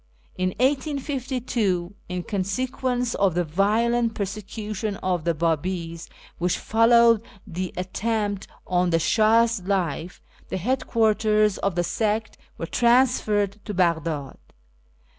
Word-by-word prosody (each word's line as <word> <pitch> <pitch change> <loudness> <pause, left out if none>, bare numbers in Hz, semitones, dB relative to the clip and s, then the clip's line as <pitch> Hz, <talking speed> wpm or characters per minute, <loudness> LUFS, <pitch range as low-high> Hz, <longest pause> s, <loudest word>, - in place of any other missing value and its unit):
In 185 0 0
1852, 255 - -1 0.2
in 180 -1 -3
consequence 245 +5 -1
of 195 -4 +1
the 175 - +2
violent 225 +7 +1
persecution 210 +1 -4
of 180 -4 -2
the 170 -1 +1
Babis 165 +1 -2 0.3
which 175 +1 +1
followed 230 0 +4 0.2
the 185 -2 -4
attempt 205 +2 -2 0.2
on 180 0 +1
the 165 - +3
Shah's 225 +5 +3
life, 180 -3 -2 0.3
the - - -2
headquarters 215 -2 +2
of 195 -3 -1
the 175 - +1
sect 220 +3 -1 0.2
were - - -4
transferred 220 -5 +2
to 210 -2 -5
Baghdad. 160 -5 0
205 Hz, 110 wpm, -24 LUFS, 180-230 Hz, 0.3 s, followed